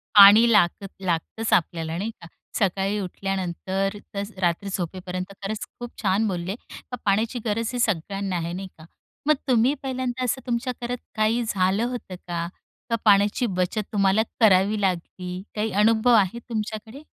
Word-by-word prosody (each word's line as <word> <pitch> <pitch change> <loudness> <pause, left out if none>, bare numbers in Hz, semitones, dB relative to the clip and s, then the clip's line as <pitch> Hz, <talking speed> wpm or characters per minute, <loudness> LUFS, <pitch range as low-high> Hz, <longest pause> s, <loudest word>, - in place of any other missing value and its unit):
पाणी 210 +4 +9
लागत 195 0 +3
लागतंच 185 +5 -1
आपल्याला 165 -1 +1
नाही 210 +5 -2
का, 170 - -10 0.3
सकाळी 195 +1 +1
उठल्यानंतर 195 +1 -2 0.2
ते 200 - -2 0.2
रात्री 175 +3 0
झोपेपर्यंत. 185 +1 -4
खरंच 215 +2 -3
खूप 240 0 -6
छान 205 +2 +2
बोलले, 185 0 -2
का 250 +1 -10
पाण्याची 220 +5 +1
गरज 225 +1 0
ही 245 - -2
सगळ्यांना 195 -2 -1
आहे, 170 0 -2
नाही 190 +1 -5
का. 160 - -13 0.4
मग 305 - +6
तुम्ही 250 +2 +4
पहिल्यांदा 255 -1 -2
असं 250 +2 0
तुमच्या 245 +1 -1
घरात 245 +1 -2 0.2
काही 220 +2 +2
झालं 195 0 +1
होतं 245 -7 -5
का? 170 -1 -2 0.4
का 230 - +2
पाण्याची 205 +4 +4
बचत 195 +4 0
तुम्हाला 200 +1 +3 0.2
करावी 205 -1 +4
लागली, 180 0 -2
काही 215 +1 -1
अनुभव 220 +4 +4
आहे 205 +2 +2
तुमच्याकडे? 220 +4 -4
200 Hz, 150 wpm, -24 LUFS, 185-225 Hz, 0.4 s, पाणी